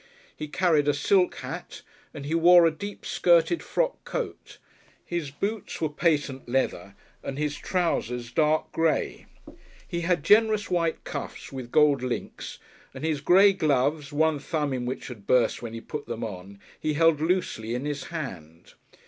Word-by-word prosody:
He 155 - -6
carried 155 -2 +2
a 145 - +3
silk 180 +5 +2
hat, - - -7 0.3
and 140 - -8
he 150 - -2
wore 170 +1 +7
a 165 - +4
deep 200 +6 -8
skirted 175 - +3
frock - - -1
coat, - - -5 0.5
his 170 -5 -3
boots 200 +9 -4
were 160 - 0
patent 145 -5 0
leather 130 +2 -1 0.3
and 135 - -5
his 150 0 -1
trousers 125 -10 -1
dark 155 +3 +1
grey. 165 -1 0 0.6
He 170 - -3
had 170 -3 +1
generous 215 +2 +4
white 170 -2 0
cuffs - - -6
with 130 -3 -7
gold 150 -3 +4
links, 125 -1 -5 0.4
and - - -8
his 155 -3 -1
grey 195 +6 +6
gloves, 150 -3 +1
one 155 0 +2
thumb 150 -2 -2
in 125 -1 -3
which 130 - -4
had 110 -6 -10
burst 125 -3 +3
when 115 -1 -6
he 115 - -6
put 150 +4 -7
them 115 0 -4
on, 100 -2 -7 0.2
he 155 - -1
held 165 -1 +4
loosely 155 -10 -1
in 125 +3 -3
his 145 -1 -3
hand. 90 - -7
150 Hz, 165 wpm, -26 LUFS, 130-170 Hz, 0.6 s, wore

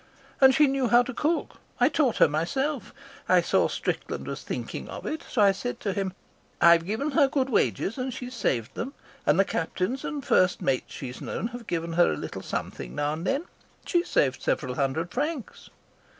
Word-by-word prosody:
And 265 -1 +8
she 300 - +6
knew 270 -2 +1
how 240 +1 +6
to 265 - -6
cook. 315 +6 -1 0.2
I 245 - +6
taught 275 -5 +1
her - - +7
myself. 265 - -1 0.4
I - - +6
saw - - +2
Strickland - - -3
was - - -5
thinking - - -5
of - - -7
it, 315 - -3
so 215 - +3
I 200 - +7
said 220 +6 -4
to 200 - -1
him: 190 -1 -2 0.5
'I've 170 0 +6
given 270 +9 -1
her 285 -2 +5
good 270 -1 0
wages 215 +1 +1
and 255 +1 -2
she's 250 +1 -7
saved 125 - -1
them, 265 +5 -5 0.3
and 150 +5 +4
the 195 - +5
captains 185 +11 -2
and 290 -3 -4
the - - -15
first 185 -1 +3
mates 135 -2 -1
she's 130 -2 -7
known 225 - -3
have 240 -1 -9
given 165 -1 -2
her 175 - +4
a - - -4
little - - -6
something - - -5
now 145 +1 0
and 165 +4 -4
then. 275 +4 +1 0.4
She's 345 -1 +1
saved 130 -2 +2
several 125 - -1
hundred 140 +6 -1
francs.' 290 -1 -4
230 Hz, 200 wpm, -27 LUFS, 165-270 Hz, 0.5 s, And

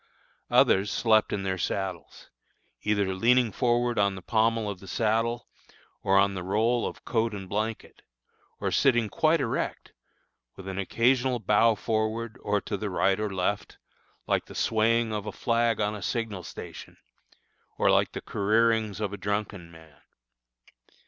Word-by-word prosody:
Others 100 +2 +4
slept 110 -2 +3
in 100 - -2
their 95 -1 -2
saddles, 95 -1 -4 0.5
either 100 -2 0
leaning 120 +4 +3
forward 120 +1 +1
on 100 -1 +2
the 95 - -9
pommel 115 0 +1
of 100 -3 -5
the 95 - -13
saddle, 115 +4 0 0.5
or 95 0 +3
on 100 0 +4
the 95 - -4
roll 110 +6 +1
of - - -9
coat 115 -2 0
and 95 -2 -7
blanket, 110 +3 -4 0.6
or - - -1
sitting 120 -5 +3
quite 160 +7 +2
erect, - - -3 0.6
with 95 - -10
an 95 0 -4
occasional 125 +5 +2
bow 110 +1 +3
forward 110 +1 -2
or 105 0 0
to 100 - -4
the 105 +1 -4
right 95 +1 +1
or 105 -1 -1
left, 95 +2 -2 0.5
like - - 0
the - - -12
swaying 115 0 +1
of 105 0 -4
a - - -3
flag 115 -1 0
on 105 0 0
a 105 - -7
signal 110 -2 -3
station, - - -10 0.8
or - - +3
like - - +2
the - - -5
careerings 110 0 +1
of 105 -2 -2
a - - -5
drunken 100 -3 -3
man. 80 -2 -17
105 Hz, 155 wpm, -27 LUFS, 100-115 Hz, 0.8 s, Others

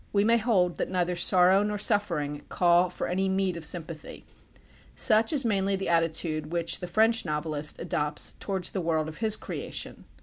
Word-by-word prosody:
We 200 -1 +2
may 230 +2 +3
hold 190 -7 +1
that - - -2
neither 180 -1 -1
sorrow 185 +2 +4
nor 210 0 -2
suffering 170 -9 0
call 175 0 +3
for - - -5
any 190 +2 -1
meed 190 -1 0
of 170 - -8
sympathy. 160 0 -7 0.7
Such 220 0 +4
is 280 -5 +1
mainly 195 -3 0
the 195 -2 -4
attitude 160 -2 -1
which 170 -1 0
the 180 - -6
French 225 +5 +2
novelist 150 -1 -3
adopts 150 -3 0
towards 190 -3 -3
the 190 - -3
world 160 -2 -1
of 155 - -9
his 220 -2 +4
creation. - - -6
180 Hz, 175 wpm, -27 LUFS, 165-200 Hz, 0.7 s, sorrow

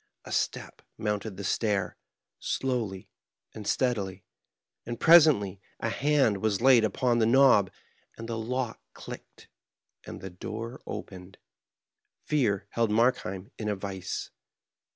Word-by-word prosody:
A - - -9
step - - -2 0.2
mounted 105 -2 -3
the 100 - -6
stair 100 -1 0 0.4
slowly 115 -8 -2 0.5
and 105 -2 -8
steadily, 100 -7 -1 0.6
and 120 0 -6
presently 150 - +6 0.2
a 115 - -1
hand 135 -5 +2
was 105 -3 +1
laid 125 -2 +6
upon 120 +2 +1
the 110 - +3
knob, 125 -6 +5 0.5
and 115 - -7
the 115 - -3
lock 120 +1 -3
clicked, - - -11 0.6
and - - -8
the 95 - -8
door 115 +7 -7
opened. 95 0 -8 0.9
Fear 105 -10 +1
held 115 -1 +1
Markheim 105 -3 0
in 105 -1 -2
a 105 - 0
vise. 95 -1 -5
110 Hz, 125 wpm, -28 LUFS, 100-125 Hz, 0.9 s, presently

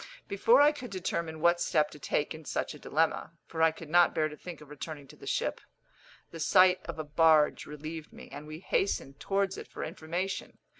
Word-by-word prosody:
Before 470 -6 +5
I 295 +1 +7
could 285 -5 -8
determine 170 -4 -3
what 170 +1 +4
step 150 0 +2
to 150 - -12
take 145 +2 -1
in 160 0 -10
such - - -3
a 150 - -12
dilemma 160 +1 0
(for 160 - -4
I 160 - +7
could 160 0 -9
not 175 +2 +4
bear 155 -1 +2
to 150 - -9
think 175 +3 -9
of 150 -1 -14
returning 150 -1 -7
to - - -13
the - - -12
ship), - - -1 0.7
the 165 - -8
sight 185 +3 +5
of - - -5
a 155 - -3
barge 155 0 +4
relieved 155 +1 -7
me, - - -12
and 145 +2 -8
we 155 +2 -8
hastened 140 -9 -1
towards 195 -1 0
it - - -9
for - - -7
information. 175 +5 -4
160 Hz, 210 wpm, -30 LUFS, 150-175 Hz, 0.7 s, I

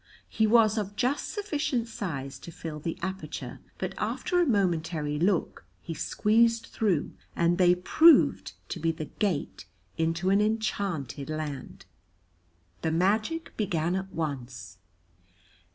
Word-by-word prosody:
He 220 -1 +2
was 220 -1 +5
of 205 0 -4
just 255 +5 0
sufficient 295 - -1
size 160 - -5
to 170 - -10
fill 155 -1 -7
the 165 +3 -4
aperture, 190 +1 -5 0.2
but - - -3
after 355 -1 0
a 345 - +2
momentary 165 - 0
look 180 +1 0 0.2
he 165 - -6
squeezed 230 +6 +2
through, 190 -9 0 0.2
and 170 +2 +2
they 180 -1 +6
proved 315 - +5 0.2
to 175 - -4
be 165 +1 +1
the 160 -1 -6
gate 180 - -2 0.3
into 165 +3 +1
an 200 +1 +4
enchanted 200 - -2
land. 155 -4 -5 1.0
The 160 - 0
magic 215 - 0
began 175 -4 0
at 190 0 -4
once. 130 - -5
185 Hz, 130 wpm, -28 LUFS, 160-220 Hz, 1.0 s, they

